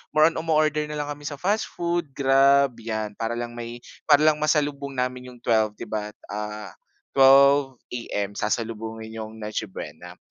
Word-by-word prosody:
more 155 +1 +6
on - - -6
umo-order 155 -1 +2
na 150 - -4
lang 145 0 -3
kami 145 0 -9
sa 145 - -7
fast 205 +4 0
food, 170 -3 -1
grab 140 0 +4
'yan. 110 -2 -3
Para 115 +1 -2
lang 120 0 -4
may 120 0 -6 0.3
para 145 +1 +6
lang 155 -1 +5
masalubong 145 -2 0
namin 125 0 -2
yung 125 - -15
12 110 -2 +2
'di - - -6
ba? 105 -1 -3 0.2
Ah, 105 -2 -5 0.4
12 135 0 +6 0.2
AM 105 -4 -3
sasalubungin 110 0 -3
yung 110 0 -8
Noche 105 0 -4
Buena. - - -9
125 Hz, 170 wpm, -24 LUFS, 110-145 Hz, 0.4 s, more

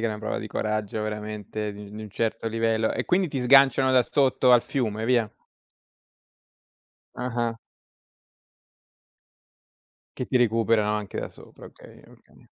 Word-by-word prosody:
è 115 - 0
una 105 - -4
prova 110 0 -3
di 110 - -7
coraggio 110 0 -2
veramente 105 0 -5
di 100 0 -11
di 110 +1 -8
un 105 - -9
certo 115 +2 -2
livello. 115 0 0
E, - - -2
quindi, 185 0 +1
ti 140 -3 -3
sganciano 135 0 +5
da 125 - +5
sotto 130 -1 +2
al 120 -1 +6
fiume 110 -6 -2
e - - -1
via? 120 -4 +1 1.8
Ah-ah. 120 -2 -2 2.6
Che 125 - -4
ti 130 - 0
recuperano 115 -3 +2
anche 105 -2 -5
da - - -4
sopra, - - -16
okay, - - -15
okay. - - -21
115 Hz, 145 wpm, -25 LUFS, 105-125 Hz, 2.6 s, al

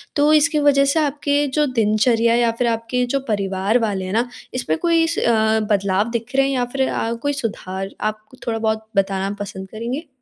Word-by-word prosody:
तो 295 0 +4
इसकी 305 +1 +4
वजह 285 -1 +4
से 320 - +2
आपके 290 -1 +1
जो 300 - +4
दिनचर्या 225 +1 +3
या 235 -1 +3
फ़िर 245 - +2
आपके 230 +2 -1
जो 275 +3 -1
परिवार 200 +1 0
वाले 205 -5 -1
हैं 185 - -4
ना 235 +3 +1 0.3
इसमें 160 -11 -1
कोई 335 -1 +3
स 335 - -2
अ, 220 -1 +2
बदलाव 200 +1 +1
दिख 235 +2 -4
रहे 270 0 +4
हैं 275 - 0
या 250 -1 +1
फ़िर 265 +2 -1
अ, 230 - -1
कोई 235 +5 -2
सुधार? 195 -7 -4
आप 215 0 -1
कु 255 - -17
थोड़ा-बहुत 220 -1 -1
बताना 195 0 0
पसंद 190 -1 -6
करेंगे? 240 - -5
230 Hz, 200 wpm, -20 LUFS, 210-275 Hz, 0.3 s, तो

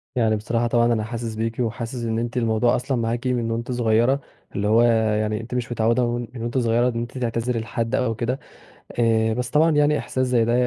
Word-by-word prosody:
يعني 110 -3 +2
بصراحة، 115 +2 -1
طبعًا 120 0 +3
أنا 110 -1 0
حاسس 115 -1 -5
بيكِ 115 +2 -3
وحاسس 115 +1 -3
إن 115 0 -1
أنتِ 120 +2 -3
الموضوع 115 0 +2
أصلًا 125 +1 -1
معاكِ 115 +2 -1
من 120 -2 0
وأنتِ 115 +2 -3
صغيرة، 120 +3 +2 0.3
اللي 100 +1 0
هو 115 +2 +5 0.4
يعني 110 +1 -1
أنتِ 125 +2 -6
مش 120 -1 -2
متعودة 115 +2 +2
من 120 -1 -5 0.2
وأنتِ 120 +2 -2
صغيرة 120 +1 +2
إن 115 -1 -3
أنتِ 120 +2 -6
تعتذري 120 0 -1
لحد 115 +2 -2
أو 115 -3 0
كده 125 +4 -2 0.6
آآ 110 -1 +3
بس 125 0 -2
طبعًا 160 +3 +4
يعني 150 0 +3
إحساس 130 0 -1
زي 120 -2 +2
ده 120 - +1
115 Hz, 210 wpm, -23 LUFS, 115-125 Hz, 0.6 s, هو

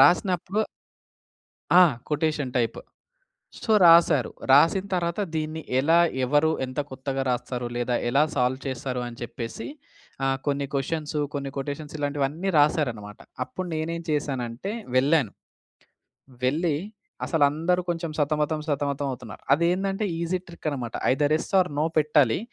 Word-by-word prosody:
రాసినప్పుడు 185 +6 +3 1.1
ఆ! 180 - +9 0.3
Quotation 150 -3 -1
type. 115 -2 0 0.9
So, 220 - 0
రాసారు. 165 -5 +6 0.2
రాసిన 165 +8 +5
తర్వాత 170 +1 -1 0.2
దీన్ని 155 +1 -3 0.2
ఎలా, 160 +5 +4 0.3
ఎవరు 150 +4 +3 0.2
ఎంత 130 +3 -5
కొత్తగా 135 +1 -3
రాస్తారో 125 0 -2
లేదా 120 0 0
ఎలా 140 +4 +4
సాల్వ్ 130 +1 +1
చేస్తారు 130 -1 -3
అని 120 -1 -9
చెప్పేసి 120 - -6 0.6
ఆహ్, 135 0 +1
కొన్ని 140 -1 0
క్వశ్చన్స్, 150 +2 -2 0.2
కొన్ని 140 -1 -3
కొటేషన్స్, 145 +2 -5
ఇలాంటివన్నీ 145 +5 -1
రాసారన్నమాట. 120 -9 0 0.2
అప్పుడు 155 +9 -6
నేనేం 165 +2 -3
చేశానంటే, 135 - -2 0.2
వెళ్ళాను. 135 -3 +3 1.1
వెళ్ళి 155 +3 +1 0.5
అసలు 160 -4 +2
అందరూ 165 +5 0
కొంచెం 170 -2 -2
సతమతం, 150 +1 0
సతమతం 140 -1 -1
అవుతున్నారు. 115 -5 -9
అది 165 +4 +2
ఏందంటే 195 +3 -1
ఈజీ 170 +2 0
ట్రిక్ 170 -2 -8
అన్నమాట. 125 -5 -4 0.2
ఐదర్ 145 +3 +2
ఎస్ - - -7
ఆర్ 180 -1 +2
నో 155 - +2
పెట్టాలి. 150 -6 +4
145 Hz, 130 wpm, -25 LUFS, 130-165 Hz, 1.1 s, ఆ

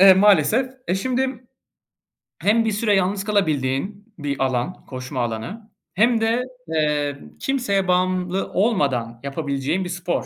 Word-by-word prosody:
Eee, 190 0 +10
maalesef. 210 - +4 0.2
Eee, 180 - +2
şimdi 255 +3 -1 1.0
hem 225 +3 +3
bir 220 - +1
süre 210 0 +2
yalnız 195 +1 +1
kalabildiğin 195 - -1
bir 140 -2 -2
alan, 130 +7 -2
koşma 130 0 -6
alanı 120 - -5 0.3
hem 225 +3 +3
de, 230 +3 +2 0.2
eee, 150 -3 0 0.2
kimseye 200 -8 0
bağımlı 185 +1 +1
olmadan 140 - +1
yapabileceğin 140 +4 -1
bir 180 - -5
spor. 175 0 -2
185 Hz, 130 wpm, -22 LUFS, 145-215 Hz, 1.0 s, Eee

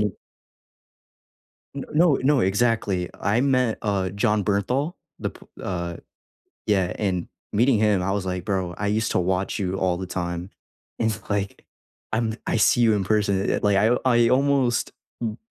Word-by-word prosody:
you 105 -3 -1 1.6
N 140 - -5
no, 160 -1 +4
no 135 -1 +3
exactly, 100 -3 +1
I 105 +4 +2
met, 130 -4 +2
uh, 100 -4 0
Jon 105 +1 +1
Bernthal, 125 - 0 0.2
the - - -3
p - - -17 0.2
Uh, 85 -2 -3 0.7
yeah, 95 -4 +2
and 95 -4 -1 0.2
meeting 120 +2 +3
him, 105 -4 +2
I 95 +1 0
was 100 -2 -2
like, 90 -1 -3
"Bro, 95 -3 -2
I 105 - -3
used 110 +1 0
to - - +2
watch 95 +1 -1
you 95 -1 -1
all 90 -2 +1
the 95 0 -5
time." 85 0 -4 0.5
It's 110 -1 0
like, 100 -1 -2 0.5
I'm 110 -1 0
I - - +1
see 120 - +4
you 110 -2 +5
in 100 -2 0
person, 100 -2 +1
eh, - - +1
like, 100 -1 +3
I 110 +5 +4
I 120 -2 +4
almost 130 -2 +2 0.3
b 110 -2 -3
105 Hz, 165 wpm, -24 LUFS, 95-115 Hz, 1.6 s, you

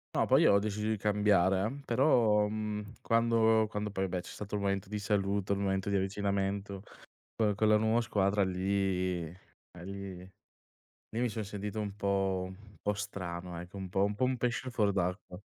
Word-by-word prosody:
No, - - +3
poi - - +5
ho 100 - +6
deciso 105 +1 -2
di 110 - +1
cambiare 100 -2 +3
eh, 140 +4 -6
però, 115 -5 +4
mhmm, 105 0 -4
quando 115 -1 +3
quando 105 -1 -3
poi, 95 -1 -1
beh, 90 0 -2
c'è - - -10
stato 105 0 -6
il 100 - -1
momento 100 -1 -1
di 105 - -3
saluto, 100 -1 0
il 100 - -2
momento 95 0 0
di 100 - +2
avvicinamento, 100 0 -1 0.6
co 105 -2 +2
con 110 +2 +2
la 105 - +6
nuova 110 +2 +2
squadra 100 -2 +1
lì 95 -1 0
eh, 90 +4 -12 0.4
lì 100 -1 -6
lì 95 0 -19 0.7
mi 125 - +2
son 110 -1 -4
sentito 105 +1 -4
un 100 -2 -4
po' 95 -2 0
un 100 +2 -13
po' 105 - 0
strano 90 -4 -5
ecco, 90 +3 -10
un 95 -2 -5
po' 95 +2 +2
un 105 0 -2
po' 130 - -1
un 130 0 +2
pesce 125 +2 -1
fuor 105 -4 +1
d'acqua. 90 -1 -2
100 Hz, 190 wpm, -31 LUFS, 95-105 Hz, 0.7 s, ho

